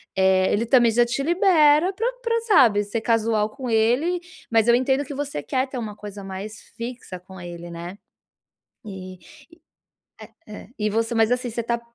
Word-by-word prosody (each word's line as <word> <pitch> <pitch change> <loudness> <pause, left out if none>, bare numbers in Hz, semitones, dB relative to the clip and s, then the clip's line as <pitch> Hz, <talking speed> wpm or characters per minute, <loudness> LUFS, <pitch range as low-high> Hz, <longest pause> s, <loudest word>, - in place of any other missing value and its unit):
Eh, 190 0 +3
ele 225 +3 +1
também 240 0 +4
já 240 +2 +3
te 245 +3 -2
libera 340 -1 +4
pra 450 +5 -2 0.2
pra, 460 0 0
sabe, 260 - +4
ser 205 +2 -4
casual 220 -2 +1
com 255 +2 -7
ele. 245 +11 +2 0.3
Mas 225 0 +3
eu 235 - +6
entendo 265 +3 +1
que 285 - -7
você 285 0 -4
quer 265 -1 -1
ter 260 - -7
uma 215 -3 -6
coisa 205 -1 -9
mais 195 +2 -6 0.2
fixa 235 -5 -7
com 190 +1 -13
ele, 175 0 -8
né. 170 +3 -8 0.9
E, 185 -2 -8 1.3
eh 210 - -10
eh, - - -18
e 210 0 0
você 225 +2 -1
mas 225 +1 +3
assim, 250 0 -1
você 235 +1 -3
tá 235 0 -1
230 Hz, 180 wpm, -23 LUFS, 205-265 Hz, 1.3 s, eu